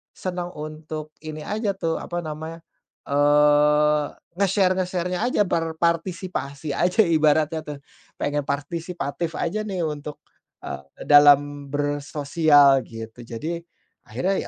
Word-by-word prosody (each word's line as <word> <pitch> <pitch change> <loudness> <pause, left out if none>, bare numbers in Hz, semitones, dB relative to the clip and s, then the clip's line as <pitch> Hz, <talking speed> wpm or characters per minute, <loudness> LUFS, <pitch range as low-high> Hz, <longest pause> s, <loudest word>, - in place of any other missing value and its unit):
senang 180 -1 -5
untuk 155 0 -7
ini 155 -1 -7
aja, 210 +1 -2
tuh, 165 -4 -2
apa 175 0 -4
namanya, 160 +1 -7 0.4
eee, 150 +1 +3 0.2
nge-share-nge-share-nya 185 0 +1
aja, 250 - +1
berpartisipasi 165 -3 -2
aja 180 +9 +3
ibaratnya. 155 -2 +2
tuh, 150 -1 -5 0.4
pengen 145 -1 -2
partisipatif 160 +2 -3
aja, 210 +6 -1
nih, 190 -3 -3
untuk, 150 -1 -5 0.5
eee, 70 - -5 0.2
dalam 145 -1 +5
bersosial, 145 0 +3
gitu. 115 +1 -9
Jadi 150 +9 -4 0.5
akhirnya, 195 +2 -1
155 Hz, 105 wpm, -23 LUFS, 145-175 Hz, 0.5 s, dalam